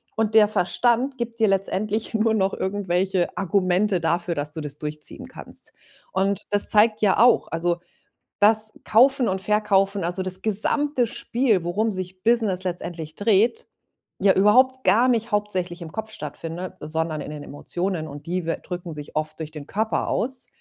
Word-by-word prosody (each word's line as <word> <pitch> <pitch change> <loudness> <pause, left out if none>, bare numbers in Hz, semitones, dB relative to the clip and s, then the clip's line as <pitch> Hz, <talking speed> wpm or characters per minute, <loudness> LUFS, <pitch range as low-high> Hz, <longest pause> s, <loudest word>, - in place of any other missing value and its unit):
und 220 0 0
der 210 -1 +7
Verstand 240 +7 +1
gibt 235 -1 -5
dir 220 - +4
letztendlich 200 +3 -1
nur 220 0 +2
noch 195 -1 +1
irgendwelche 190 -2 -1
Argumente 190 0 +1
dafür, 170 +1 0
dass 145 +1 -2
du 160 0 -6
das 145 -1 -6
durchziehen 150 0 -6
kannst. - - -9 0.4
Und 195 +1 0
das 205 0 +3
zeigt 215 +1 +4
ja 205 -2 +3
auch, 245 +2 +5
also, 170 +1 0 0.6
das 215 +1 +4
Kaufen 255 +2 +4
und 190 0 -2
Verkaufen, 200 -2 +1
also, 180 +2 -2
das 185 0 -3
gesamte 245 +5 +1
Spiel, 230 -5 0
worum 210 +6 0
sich 185 -1 -6
Business 220 -5 +2
letztendlich 170 -3 -5
dreht, 220 - +2 0.5
ja 195 0 +5
überhaupt 255 +7 +4
gar 240 +4 +5
nicht 230 -1 0
hauptsächlich 185 -4 -2
im 160 - -8
Kopf 220 +2 -5
stattfindet, 165 +3 -6
sondern 160 0 -2
in - - -7
den 150 -1 -7
Emotionen 175 +3 -4
und 145 0 -10
die 180 0 -2
we 165 - -1
drücken 175 -1 -6
sich 150 -1 -7
oft 155 +1 -3
durch 155 -1 -5
den 150 -2 -9
Körper 220 +2 -1
aus 250 0 -2
195 Hz, 165 wpm, -23 LUFS, 175-220 Hz, 0.6 s, der